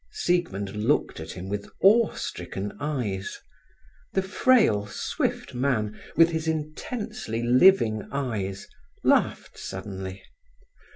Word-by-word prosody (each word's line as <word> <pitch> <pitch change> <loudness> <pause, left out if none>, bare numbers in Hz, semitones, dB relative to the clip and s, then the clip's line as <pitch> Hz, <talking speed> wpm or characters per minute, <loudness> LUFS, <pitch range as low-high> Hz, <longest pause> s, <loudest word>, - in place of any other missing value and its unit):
Siegmund 170 - -1
looked 110 - +1
at 80 0 -7
him 90 +1 -7
with 100 +1 -4
awe 220 +3 +5
stricken 95 +3 -5
eyes. 125 -10 -3 0.8
The 190 - +1
frail, 190 - +3
swift 105 - -2
man, 120 -5 0 0.2
with 165 +2 +6
his 160 0 -2
intensely 155 - -3
living 120 - +5
eyes, 105 -8 -3 0.4
laughed - - +1
suddenly. 95 0 -6
120 Hz, 105 wpm, -26 LUFS, 100-165 Hz, 0.8 s, with